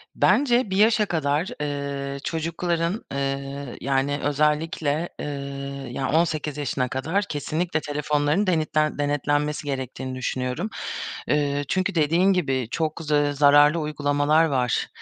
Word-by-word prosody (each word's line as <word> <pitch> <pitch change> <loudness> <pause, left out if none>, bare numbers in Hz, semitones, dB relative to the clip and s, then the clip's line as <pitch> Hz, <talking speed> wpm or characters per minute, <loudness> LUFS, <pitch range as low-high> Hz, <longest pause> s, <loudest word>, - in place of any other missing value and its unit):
Bence 245 -5 +3
bir 190 - -1
yaşa 215 +1 +4
kadar, 155 -2 0
eee, 140 -1 -3
çocukların, 170 +5 -2
eee, 140 -1 -3
yani, 135 +2 0
özellikle, 150 +2 0
eee, - - -4 0.7
ya, 135 +1 -2
18 155 -2 0
yaşına 135 -3 -1
kadar 160 +11 -1
kesinlikle 160 +2 -1
telefonlarının 150 +5 0
denetlen 155 -3 +1
denetlenmesi 145 +1 0
gerektiğini 130 -1 -4
düşünüyorum. 130 - -2 0.6
Eee, 145 -1 +1
çünkü 190 +3 0
dediğin 170 +5 +3
gibi 135 -9 0
çok 155 +2 -2
z 155 - -5
eee, 145 -1 +3
zararlı 145 +2 +5
uygulamalar 150 +1 +2
var, 130 -6 0
150 Hz, 120 wpm, -24 LUFS, 140-165 Hz, 0.7 s, zararlı